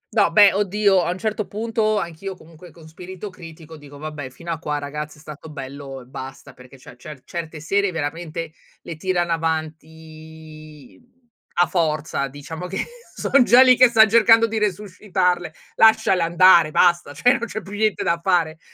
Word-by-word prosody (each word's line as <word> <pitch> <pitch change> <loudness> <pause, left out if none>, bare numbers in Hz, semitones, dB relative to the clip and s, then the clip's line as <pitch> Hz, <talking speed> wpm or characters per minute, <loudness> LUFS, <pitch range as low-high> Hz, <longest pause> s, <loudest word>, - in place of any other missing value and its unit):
No - - +3
beh, 205 -2 +6
oddio, 200 -1 +2
a 170 - -2
un 180 - -3
certo 215 0 -3
punto 220 0 -1
anch'io 170 +2 -5
comunque 165 0 -16
con 160 -1 -16
spirito 185 +4 -9
critico 165 -2 -13
dico: 145 -1 -14
"Vabbè 150 -2 -7
fino 170 +6 -9
a 160 - -4
qua 150 -3 -3
ragazzi 150 +1 -6
è 150 - -17
stato 155 +1 -11
bello 135 -1 -9
e 125 - -15
basta," 135 +1 -10
perché 125 +1 -16
cioè 125 - -15
cer 140 0 -12
certe 165 -2 -7
serie 200 +4 0
veramente 165 +1 -5 0.3
le 170 - -7
tirano 175 +1 -1
avanti, 155 - -7
mhmm, 255 - -33 0.3
a 175 +1 +4
forza 155 -4 -1
diciamo 155 +6 -8
che 190 +2 -6 0.4
sono 275 - +2
già 245 +2 +7
lì 255 -1 +6
che 250 0 +6
stan 225 -2 +5
cercando 225 +1 +5
di 225 -1 -3
resuscitarle, 185 -3 -2 0.3
lasciale 220 -5 +4
andare, 170 -1 +5
basta, 175 0 +2
cioè 245 +11 +3
non 235 - -4
c'è 215 - -6
più 195 - -12
niente 215 -1 0
da 170 0 0
fare. 165 -3 0
170 Hz, 175 wpm, -21 LUFS, 155-195 Hz, 0.4 s, già